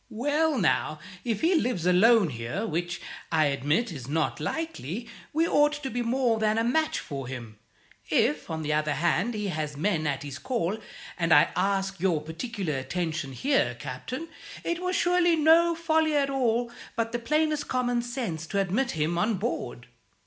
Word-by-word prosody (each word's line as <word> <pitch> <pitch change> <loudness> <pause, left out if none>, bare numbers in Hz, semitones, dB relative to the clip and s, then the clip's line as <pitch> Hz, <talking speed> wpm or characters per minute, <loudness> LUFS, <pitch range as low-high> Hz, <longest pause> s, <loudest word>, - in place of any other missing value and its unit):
Well, 290 +6 +1
now, 155 -5 +1 0.3
if 225 -4 -1
he 335 +3 +3
lives 245 - 0
alone 190 0 +5
here 120 - -3
which, 175 0 -2 0.3
I 160 -2 +4
admit, 145 - +1
is 135 -6 -7
not 155 +2 0
likely 235 - -4 0.2
we 325 +2 +2
ought 295 -1 +4
to 295 -3 -5
be 245 - -1
more 240 -1 +1
than 215 0 +2
a 225 - +2
match 310 +7 +1
for 135 -3 -5
him. 115 -4 -8 0.5
If, 150 +2 +1
on 160 -1 -3
the 150 0 0
other 155 0 +1
hand, 185 +7 +1
he 210 -1 -2
has 150 -4 -3
men 160 -2 0
at 140 -1 -2
his 140 -1 -7
call 220 -6 -1 0.4
and 165 -1 +1
I 145 - +7
ask 195 +1 0
your 175 -3 +2
particular 160 - -4
attention 160 -2 -3
here, 265 - +1
Captain 255 - -5 0.4
it 340 0 -1
was 365 0 -1
surely 350 -1 +3
no 330 +2 +5
folly 320 -2 +2
at 280 -1 +2
all, 240 -3 +1 0.2
but 230 0 -1
the 240 - -2
plainest 305 +4 0
common 245 -1 0
sense, 235 - -4
to 200 - -1
admit 200 +7 0
him 160 +3 0
on 215 +4 +2
board. 175 - -4
210 Hz, 175 wpm, -27 LUFS, 155-265 Hz, 0.5 s, I